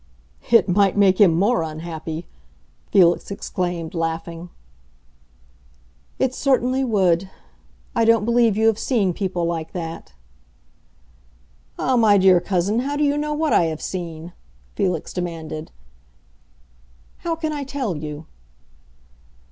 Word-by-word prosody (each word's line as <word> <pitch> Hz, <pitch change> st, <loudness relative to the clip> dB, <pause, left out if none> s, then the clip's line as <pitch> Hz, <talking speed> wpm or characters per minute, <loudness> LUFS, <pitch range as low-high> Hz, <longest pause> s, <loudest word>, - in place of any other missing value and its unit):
"It 230 Hz, -4 st, +5 dB
might 195 Hz, +1 st, +2 dB
make 195 Hz, -1 st, +4 dB
him 175 Hz, -5 st, +6 dB
more 210 Hz, +5 st, +2 dB
unhappy!" 160 Hz, +1 st, -6 dB, 0.7 s
Felix 175 Hz, -3 st, +4 dB
exclaimed, 175 Hz, -4 st, -4 dB
laughing. 165 Hz, +1 st, -4 dB, 1.7 s
"It 260 Hz, -1 st, 0 dB
certainly 260 Hz, -1 st, +1 dB
would. 190 Hz, -6 st, +1 dB, 0.7 s
I 230 Hz, -, +3 dB
don't 225 Hz, -2 st, +4 dB
believe 235 Hz, -3 st, +3 dB
you 220 Hz, -, +2 dB
have 225 Hz, -1 st, +3 dB
seen 205 Hz, -9 st, +1 dB
people 180 Hz, -2 st, -2 dB
like 165 Hz, -2 st, -3 dB
that." 165 Hz, -, -6 dB, 1.6 s
"Ah, 260 Hz, -1 st, +1 dB
my 215 Hz, -3 st, +5 dB
dear 190 Hz, -2 st, +5 dB
cousin, 190 Hz, +4 st, 0 dB
how 280 Hz, +3 st, -2 dB
do 295 Hz, -, 0 dB
you 285 Hz, 0 st, +2 dB
know 300 Hz, 0 st, -2 dB
what 310 Hz, 0 st, 0 dB
I 170 Hz, -, +4 dB
have 160 Hz, -1 st, -3 dB
seen?" 170 Hz, -2 st, -6 dB, 0.4 s
Felix 180 Hz, -6 st, -2 dB
demanded. 165 Hz, -3 st, -5 dB, 1.5 s
"How 335 Hz, -1 st, -3 dB
can 315 Hz, -1 st, -3 dB
I 290 Hz, -1 st, -3 dB
tell 265 Hz, -8 st, -3 dB
you?" 150 Hz, +1 st, -7 dB
190 Hz, 125 wpm, -21 LUFS, 170-235 Hz, 1.7 s, him